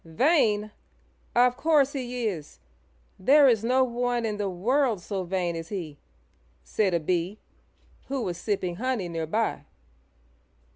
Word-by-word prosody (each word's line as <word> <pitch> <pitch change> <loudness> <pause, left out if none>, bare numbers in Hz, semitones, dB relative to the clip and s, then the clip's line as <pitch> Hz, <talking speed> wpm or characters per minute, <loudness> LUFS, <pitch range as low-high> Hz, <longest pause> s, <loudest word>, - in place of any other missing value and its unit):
"Vain! 215 - +2 0.6
Of 245 +1 +4
course 290 -3 +3
he 250 -3 -3
is. 170 -9 -4 0.6
There 280 +8 +6
is 225 -4 +3
no 255 +3 +3
one 245 -1 -1
in 210 -2 -2
the 205 -1 -1
world 230 +5 +1
so 190 +2 -4
vain 175 -1 -2
as 165 0 -6
he," 165 -8 -6 0.6
said 195 -5 0
a - - +2
Bee, 175 +4 -1 0.7
who 270 -2 -2
was 175 -4 -4
sipping 185 -4 -2
honey 250 -5 -1
near 165 -1 -3
by. 215 -5 -1
215 Hz, 140 wpm, -26 LUFS, 180-250 Hz, 0.7 s, There